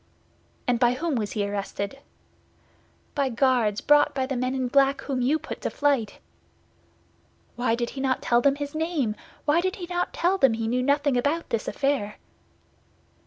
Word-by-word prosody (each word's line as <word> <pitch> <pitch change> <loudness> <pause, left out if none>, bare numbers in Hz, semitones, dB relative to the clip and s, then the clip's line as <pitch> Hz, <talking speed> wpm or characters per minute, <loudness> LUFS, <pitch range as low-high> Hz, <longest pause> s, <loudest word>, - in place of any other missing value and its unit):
"And 245 -2 +2
by 245 -1 +4
whom 315 +5 -2
was 215 -5 -2
he 205 -2 -1
arrested?" 200 +4 -4 1.1
"By 280 -2 0
Guards 235 -4 +2
brought 295 0 +4
by 265 -1 0
the 265 0 -3
men 255 +1 -1
in 260 -1 -1
black 275 +1 +3
whom 265 -3 -2
you 275 +6 +2
put 315 - -8
to - - -1
flight." 280 -7 0 1.4
"Why 240 -2 +1
did 240 0 -3
he 270 - -6
not 265 -1 +1
tell 240 0 +3
them 275 +2 +3
his 285 0 -5
name? 310 -9 -1 0.3
Why 310 +3 +3
did 375 +2 -1
he 360 - -6
not 355 0 -2
tell 370 +3 +1
them 265 -4 +5
he 225 0 -2
knew 250 +2 +1
nothing 285 0 +2
about 290 +7 0
this 225 -2 -1
affair?" 270 -7 -1
265 Hz, 175 wpm, -25 LUFS, 240-290 Hz, 1.4 s, them